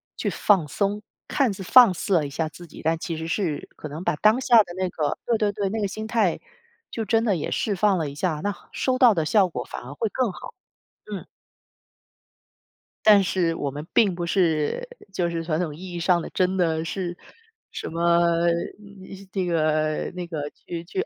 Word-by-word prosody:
去 - - -2
放 190 -8 +2
松。 200 +6 -1 0.3
看 260 -8 +2
似 195 - -9
放 225 +2 +7
肆 185 +2 -1
了 155 -4 +2
一 - - -5
下 155 +2 -2
自 175 +4 -12
己， 165 - -12
但 165 +1 +1
其 165 0 -4
实 160 +1 -5
是 165 -3 -2
可 - - -7
能 155 +4 -7
把 - - +1
当 215 - +3
下 245 -2 +5
的 175 -3 -10
那 185 -1 -1
个 155 -3 -1
对 235 -2 +2
对 210 -2 +1
对， 200 -1 -2
那 220 +3 -2
个 205 - 0
心 215 +2 -6
态 215 -6 +1 0.5
就 225 - -4
真 225 +2 +2
的 210 -5 +2
也 160 - -3
释 205 - 0
放 195 -1 +2
了 155 -3 -2
一 140 - -10
下， 155 -1 -1
那 205 - 0 0.2
收 255 -1 0
到 250 -3 +6
的 165 -5 0
效 195 +3 +4
果 125 -8 -5
反 - - -7
而 130 +3 -8
会 215 +8 -2
更 250 -6 0
好。 - - -10 0.5
嗯。 205 -3 -6 1.8
但 205 -2 +7
是 175 -2 0
我 145 -3 -3
们 150 +4 -7
并 205 -5 +4
不 175 0 -3
是 170 - +1 0.3
就 175 -2 0
是 165 -1 -3
传 160 -1 -1
统 155 -5 -2
意 180 +3 -9
义 175 - -4
上 175 0 +2
的 - - -7
真 185 +1 +1
的 160 -3 +1
是 175 0 -4 0.5
什 - - -5
么， 170 +1 +2 1.1
那 190 -2 0
个 155 -2 0
那 180 -1 -4
个 150 -4 -4
去 170 -1 -7
去 380 - -3
180 Hz, 220 characters per minute, -24 LUFS, 160-205 Hz, 1.8 s, 放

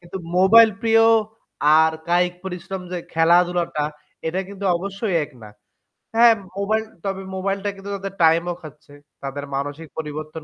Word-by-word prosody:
কিন্তু 175 +1 -9 0.2
মোবাইল 220 +4 +7
প্রিয় 225 0 +4 0.8
আর 160 0 +4 0.2
কায়িক 180 +1 +2
পরিশ্রম 190 +1 -6
যে 180 - -2 0.2
খেলাধুলাটা, 170 -1 +2 0.4
এটা 175 +4 -1
কিন্তু 200 0 -8
অবশ্যই 195 +2 -3
এক 150 - -14
না। 105 - -10 0.7
হ্যাঁ, 230 0 +7 0.2
মোবাইল 215 +2 0 0.2
তবে 195 0 -2
মোবাইলটা 195 +1 -2
কিন্তু 195 +1 -10
তাদের 195 0 -6
টাইম 165 +1 +5
ও - - -2
খাচ্ছে। 150 -2 -13 0.3
তাদের 140 +1 -5
মানসিক 145 +3 -4
পরিবর্তন 155 +1 -6
180 Hz, 145 wpm, -22 LUFS, 160-195 Hz, 0.8 s, মোবাইল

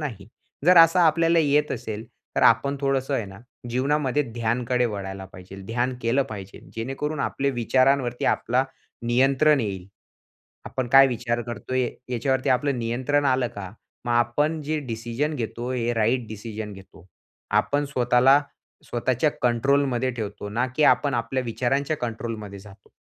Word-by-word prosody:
नाही. 110 -10 -6 0.4
जर 180 - +7
असं 165 +2 +7
आपल्याला 165 0 +4
येत 150 -1 +2
असेल, 110 -2 -5 0.3
तर - - +2
आपण 140 +5 +4
थोडंसं 135 0 0
आहे 115 - -1
ना 95 0 -11 0.3
जीवनामध्ये 140 +2 +1
ध्यानकडे 120 +2 0
वळायला 95 -2 -5
पाहिजे. 90 +2 -11
ध्यान 125 +3 -1
केलं 120 +4 +2
पाहिजे, 100 -3 -9
जेणेकरून 135 +6 -3
आपले 140 0 -1
विचारांवरती 130 0 +1
आपला 125 +2 0 0.4
नियंत्रण 135 +4 +3
येईल. 95 -4 -4 0.8
आपण 130 -2 -3
काय 135 +2 +8
विचार 120 -1 -2
करतोय? 120 +2 -2 0.2
याच्यावरती 130 +2 0
आपलं 130 +1 +1
नियंत्रण 130 +5 0
आलं 130 -2 +2
का? 95 -4 -8 0.4
मग 120 - -1
आपण 145 +7 +1
जे 155 +2 -2
डिसिजन 120 +6 -2
घेतो 120 +1 -4
हे 120 -1 -1
राइट 115 +2 +1
डिसिजन 110 0 -7
घेतो. 95 -2 -15 0.4
आपण 145 +8 +1
स्वतःला 130 +1 +4 0.4
स्वतःच्या 125 +4 0
कंट्रोलमध्ये 130 +1 +1
ठेवतो, 105 -3 -6
ना 120 +5 0
की 155 - +2
आपण 145 -2 +4
आपल्या 125 +2 -1
विचारांच्या 135 +6 -1
कंट्रोलमध्ये 110 -4 -5
जातो. 100 0 -16
125 Hz, 140 wpm, -24 LUFS, 115-140 Hz, 0.8 s, काय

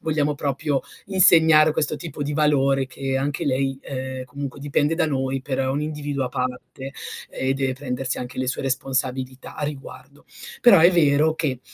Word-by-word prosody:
vogliamo 150 -2 0
proprio 140 0 -1 0.3
insegnare 160 -5 +6
questo 155 0 0
tipo 155 -2 -6
di 145 +1 -3
valore, 140 -3 +2
che 135 0 -3
anche 140 +1 -2
lei, 135 0 -1
ehm, 130 -1 -6
comunque 140 +1 -7
dipende 145 +2 0
da 165 -1 +1
noi 135 -2 -2
per 135 -1 -3
un 140 +3 -1
individuo 145 -3 -3
a 125 - -3
parte 125 +2 -5 0.4
e 130 +1 -1
deve 135 -1 -1
prendersi 130 -1 -3
anche 125 0 -7
le 130 - -1
sue 130 - -1
responsabilità 130 -1 -2
a 150 - -3
riguardo. 140 -1 -9 0.4
Però 235 -7 +7
è 170 +3 +6
vero 155 -1 +3
che 135 -6 -2
140 Hz, 170 wpm, -22 LUFS, 130-150 Hz, 0.4 s, Però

